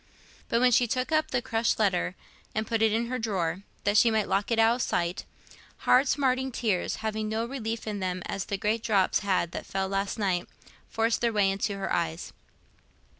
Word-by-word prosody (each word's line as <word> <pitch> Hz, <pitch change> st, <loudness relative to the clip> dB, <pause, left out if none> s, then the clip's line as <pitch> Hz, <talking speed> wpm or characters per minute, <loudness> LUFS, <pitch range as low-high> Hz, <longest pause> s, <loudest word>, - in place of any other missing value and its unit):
But 230 Hz, -, +2 dB
when 250 Hz, 0 st, +5 dB
she 240 Hz, +1 st, +4 dB
took 255 Hz, +5 st, -1 dB
up 310 Hz, 0 st, +2 dB
the 245 Hz, -1 st, -1 dB
crushed 225 Hz, +1 st, 0 dB
letter 185 Hz, -4 st, +1 dB, 0.4 s
and 220 Hz, +1 st, 0 dB
put 225 Hz, 0 st, -1 dB
it 220 Hz, -1 st, +4 dB
in 225 Hz, +2 st, +1 dB
her 250 Hz, +2 st, -3 dB
drawer, 190 Hz, -5 st, -1 dB, 0.2 s
that 205 Hz, +1 st, +2 dB
she 235 Hz, -, +6 dB
might 220 Hz, -2 st, +1 dB
lock 200 Hz, +1 st, 0 dB
it 230 Hz, -, +1 dB
out 225 Hz, +2 st, +4 dB
of -, -, -3 dB
sight, 170 Hz, -3 st, -1 dB, 0.6 s
hard 260 Hz, +3 st, +5 dB
smarting 265 Hz, -1 st, +1 dB
tears, 215 Hz, -7 st, -1 dB
having 215 Hz, 0 st, -2 dB
no 220 Hz, +1 st, -1 dB
relief 230 Hz, -3 st, -4 dB
in 210 Hz, -2 st, -3 dB
them 185 Hz, -1 st, -3 dB
as 195 Hz, -, -3 dB
the 200 Hz, -, -3 dB
great 215 Hz, +3 st, 0 dB
drops 205 Hz, -5 st, +2 dB
had 185 Hz, -4 st, 0 dB
that -, -, -6 dB
fell 190 Hz, 0 st, -1 dB
last 195 Hz, +2 st, -2 dB
night, 185 Hz, -4 st, -1 dB, 0.4 s
forced 225 Hz, +1 st, 0 dB
their 235 Hz, -1 st, +2 dB
way 205 Hz, -3 st, +3 dB
into 195 Hz, +1 st, -2 dB
her 195 Hz, -, -2 dB
eyes. 165 Hz, 0 st, -2 dB
215 Hz, 205 wpm, -28 LUFS, 195-235 Hz, 0.6 s, she